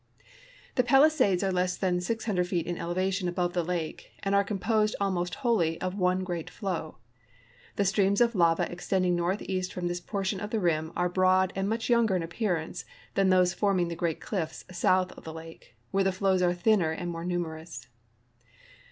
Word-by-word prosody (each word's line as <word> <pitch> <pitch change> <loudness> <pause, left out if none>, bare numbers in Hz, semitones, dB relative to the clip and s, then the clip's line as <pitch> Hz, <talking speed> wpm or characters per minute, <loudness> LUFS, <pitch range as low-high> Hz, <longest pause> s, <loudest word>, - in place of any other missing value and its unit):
The 250 - +5
Palisades 265 - +4
are 195 - +1
less 180 0 0
than 180 -2 0
600 200 -2 -1
feet 175 -2 -1
in 175 - -3
elevation 185 +2 -1
above 175 0 -1
the 175 - +1
lake, 165 -2 -4
and 195 - 0
are 200 0 +4
composed 210 +2 0
almost 180 -3 -1
wholly 170 -9 +2
of 185 0 -2
one 185 -1 +1
great 175 -3 -4
flow. 180 -7 -4 0.8
The 200 - +1
streams 195 +1 +2
of 240 0 +4
lava 170 -4 +3
extending 180 0 0
northeast 185 +1 -1
from 180 -1 -3
this 175 0 -2
portion 195 0 -2
of 210 - -5
the 220 - -1
rim 160 -3 0
are 180 - +1
broad 185 +1 +3
and 195 +1 -1
much 225 +1 -1
younger 235 -5 +3
in 175 - 0
appearance 170 -2 -2 0.3
than 195 -1 +3
those 180 -1 +4
forming 190 -4 +1
the 170 - -4
great 165 -2 -1
cliffs 175 -7 -4
south 185 +1 +2
of - - -13
the 160 - -7
lake, 165 0 -12 0.2
where 195 0 +2
the 190 - +2
flows 190 0 +1
are 175 -1 +3
thinner 180 -2 +3
and 175 +2 -3
more 165 0 -5
numerous. 165 -6 -4
185 Hz, 185 wpm, -28 LUFS, 175-195 Hz, 0.8 s, The